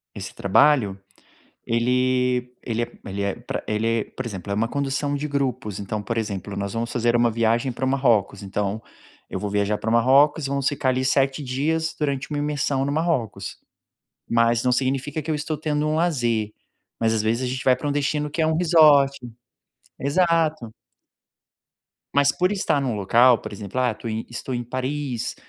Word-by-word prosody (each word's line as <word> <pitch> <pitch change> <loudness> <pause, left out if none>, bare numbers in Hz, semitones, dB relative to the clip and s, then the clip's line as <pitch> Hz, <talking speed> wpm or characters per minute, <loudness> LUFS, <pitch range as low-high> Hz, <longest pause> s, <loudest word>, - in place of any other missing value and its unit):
Esse 95 -1 -7
trabalho? 105 -1 +3 0.7
Ele 125 +1 +1
ele 115 0 -2
é - - -5
ele 100 +1 -3
é, 100 -1 -1
pra - - -5
ele 110 +1 -1
é, 115 -1 +1
por 130 - -7
exemplo, 100 -3 -6
é - - +1
uma 115 +2 0
condução 140 +1 -1
de 145 +1 -2
grupos, 130 -8 -2
então, 105 +1 -4
por 115 +1 -3
exemplo, 100 -2 -4
nós 100 0 -3
vamos 115 +1 -2
fazer 120 0 +2
uma 120 0 +3
viagem 115 +3 +1
para 130 - -4
o - - +1
Marrocos, 115 -8 +1
então 100 +2 -3 0.5
eu - - -3
vou 105 - -3
viajar 105 +1 0
pro 110 - -3
Marrocos 135 +6 +4
e - - -4
vamos 140 -1 +1
ficar 135 -2 0
ali 130 +1 0
7 135 +2 +1
dias 155 +5 -1
durante 140 -2 -2
uma 145 - -2
imersão 145 -2 0
no 140 - -1
Marrocos. 155 - -1 0.7
Mas 115 0 +3
não 125 - +2
significa 135 +4 -1
que 155 - -8
eu 155 - +1
estou 150 +1 -3
tendo 150 0 -1
um 155 - 0
lazer, 120 -10 0 0.5
mas 115 -1 +2
às 110 - +1
vezes 115 +4 0
a - - -1
gente 130 - -4
vai 130 - +5
pra 145 +3 -5
um - - 0
destino, 145 +1 -1
que 165 - -1
é 155 - +3
um 160 - +1
resort. 155 -5 +5 0.8
Exato. 155 -5 +1 1.4
Mas 145 0 +3
por 180 +2 +1
estar 190 -8 +1
em - - -2
um 120 -4 -1
local, 115 +5 +5
por - - -8
exemplo, 100 +4 -5
ah, 125 -3 +2
tô 115 - -9
em 110 0 -3
estou 120 +2 -5
em 120 - -3
Paris, 130 0 -3
130 Hz, 195 wpm, -23 LUFS, 115-145 Hz, 1.4 s, vai